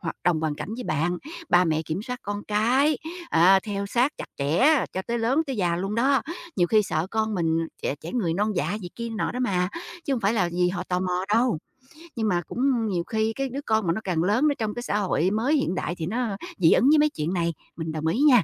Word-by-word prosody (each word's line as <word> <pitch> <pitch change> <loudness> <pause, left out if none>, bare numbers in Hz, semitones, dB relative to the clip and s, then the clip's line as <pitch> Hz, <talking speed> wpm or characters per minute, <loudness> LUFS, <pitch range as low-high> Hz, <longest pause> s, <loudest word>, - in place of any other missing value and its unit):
hoạt 165 - -4
đồng 170 -3 +2
hoàn 155 -2 -1
cảnh 145 - -6
với 250 - -6
bạn, 165 +4 0 0.3
ba 175 +1 +5
mẹ 160 -1 +1
kiểm 165 +5 -4
soát 250 +1 -5
con 205 0 -4
cái, 250 +7 +3 0.3
à, 185 +4 +6
theo 200 -1 -3
sát 250 +7 +2
chặt - - -7
chẽ 240 - +3
cho 190 - -3
tới 235 0 -1
lớn, 260 +8 +2
tới 265 -4 -3
già 175 -3 +1
luôn 195 +4 -2
đó, 270 +4 +3 0.3
nhiều 175 - +3
khi 215 +3 +4
sợ 160 -3 -1
con 220 -1 0
mình 165 -2 +1 0.2
trẻ - - -1
trẻ 165 - -7
người 180 -10 0
non 210 +3 0
dạ 170 +7 0
gì 175 - -5
kia 235 0 -4
nọ 220 - -2
đó 250 - -3
mà, 185 -6 +1 0.4
chứ 280 - -1
hông 245 - 0
phải 200 +2 +2
là 190 -6 +1
vì 180 0 +2
họ 180 -1 -3
tò 180 0 0
mò 180 0 -1
đâu. 235 -7 +2 0.6
Nhưng 220 -2 0
mà 175 -3 +1
cũng 245 -3 +1
nhiều 180 -4 -1
khi 220 +3 -1
cái 270 -1 -2
đứa 275 +3 -4
con 220 -4 +1
mà 165 - +3
nó 220 - -4
càng 170 -4 0
lớn, 220 +11 +3
nó 285 - +2
trong 215 -1 -1
cái 240 - -5
xã 210 - -1
hội 190 -2 +1
mới 240 +8 +1
hiện 275 - 0
đại 175 -1 -2
thì 160 - -3
nó 220 -1 -2 0.2
dị 165 -4 +5
ứng 265 - +4
với 310 - +6
mấy 300 0 +4
chuyện 160 - -3
này, 170 -1 0 0.2
mình 160 -1 -3
đồng 155 0 -3
ý 220 - +1
nha. 260 -7 +6
205 Hz, 260 wpm, -25 LUFS, 175-240 Hz, 0.6 s, à